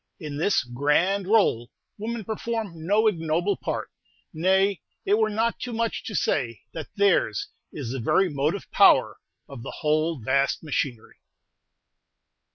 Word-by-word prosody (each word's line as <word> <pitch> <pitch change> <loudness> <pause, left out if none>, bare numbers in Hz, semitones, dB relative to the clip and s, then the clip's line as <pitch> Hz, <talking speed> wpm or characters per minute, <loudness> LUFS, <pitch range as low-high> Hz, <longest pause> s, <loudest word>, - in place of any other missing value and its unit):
In 150 -4 -6
this 180 +2 +2
"grand 150 +10 +1
rôle" 195 - +3 0.3
women 225 +1 -4
perform 215 -7 -4
no 210 +3 +3
ignoble 175 0 +1
part; - - -4 0.4
nay, 190 +3 +2 0.2
it 205 +3 +3
were 220 -1 +3
not 225 +2 0
too 245 - -5
much 230 0 -2
to 210 - -5
say 115 - 0
that 160 -2 -6
theirs 195 - +2 0.2
is 130 -6 -5
the 135 - -3
very 185 +11 +3
motive 150 +4 -1
power - - +5 0.3
of 135 -4 -9
the - - -7
whole 155 +1 +1
vast 135 +6 0
machinery. 135 -6 -3
170 Hz, 140 wpm, -25 LUFS, 140-205 Hz, 0.4 s, power